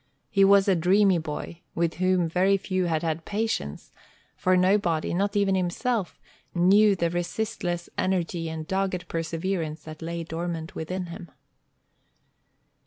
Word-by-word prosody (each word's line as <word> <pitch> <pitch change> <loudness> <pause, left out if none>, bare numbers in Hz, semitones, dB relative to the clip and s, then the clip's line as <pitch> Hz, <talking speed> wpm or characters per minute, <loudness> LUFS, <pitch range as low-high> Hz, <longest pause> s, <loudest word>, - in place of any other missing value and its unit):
He 195 -3 +4
was 195 0 +6
a 195 - +4
dreamy 185 +2 +4
boy, 160 +2 -6
with 165 -1 0
whom 185 -1 +2
very 185 +4 +3
few 185 -1 -1
had 160 -2 0
had 165 0 -2
patience; 210 - -3 0.4
for 185 0 +2
nobody, 180 -4 +2
not 200 +3 0
even 200 -1 +3
himself, 190 +3 -1 0.4
knew 200 +4 +5
the 170 -2 0
resistless 175 -1 -2
energy 175 -3 -1
and 160 -1 -5
dogged 190 -2 -1
perseverance 165 -1 -3
that 155 0 -10
lay 170 +1 -4
dormant 165 0 -4
within 180 +3 -4
him. 170 0 -9
180 Hz, 135 wpm, -26 LUFS, 165-195 Hz, 0.4 s, was